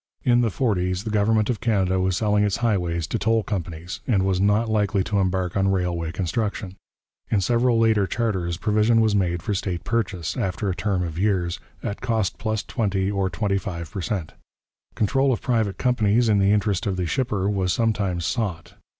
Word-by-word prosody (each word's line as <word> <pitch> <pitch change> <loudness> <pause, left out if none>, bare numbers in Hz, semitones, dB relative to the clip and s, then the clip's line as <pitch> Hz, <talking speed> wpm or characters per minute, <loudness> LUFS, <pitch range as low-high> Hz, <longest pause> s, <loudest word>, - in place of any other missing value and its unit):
In 120 -1 +4
the 115 - +2
forties 90 -5 0
the 110 - -4
government 110 +1 +2
of 120 -4 -2
Canada 95 -5 +1
was 95 -1 +1
selling 105 -1 +2
its 100 -2 +1
highways 85 -6 0
to 115 - -3
toll 115 0 +2
companies, 85 -3 -5
and 100 -6 +2
was 95 -1 +1
not 105 +3 +3
likely 105 -2 +1
to 100 0 0
embark 95 -2 0
on 95 0 +2
railway 90 -4 -1
construction. 95 +3 -2 0.6
In 105 - +2
several 120 +4 +2
later 110 -3 +3
charters 95 -8 -1
provision 110 +3 +2
was 110 -2 +3
made 90 -3 0
for 105 - -1
state 90 -3 -3
purchase, 100 -8 -2
after 95 +1 -1
a - - -3
term 95 -3 -1
of 85 -1 -4
years, 90 -4 0 0.2
at 100 - -4
cost 110 -6 -1
plus 110 -1 -1
twenty 100 -5 -1
or 100 -2 0
twenty 100 +3 0
five 85 -4 -6
per 95 - -4
cent. 95 -5 -3 0.6
Control 135 +6 +2
of 120 - 0
private 110 -6 0
companies 120 -2 +2
in 105 -2 +4
the 100 +1 +4
interest 105 -2 +1
of 95 -2 -1
the 90 - -1
shipper 105 -2 -1
was 95 -3 0
sometimes 100 -5 0
sought. 100 -9 -3
100 Hz, 190 wpm, -23 LUFS, 90-110 Hz, 0.6 s, In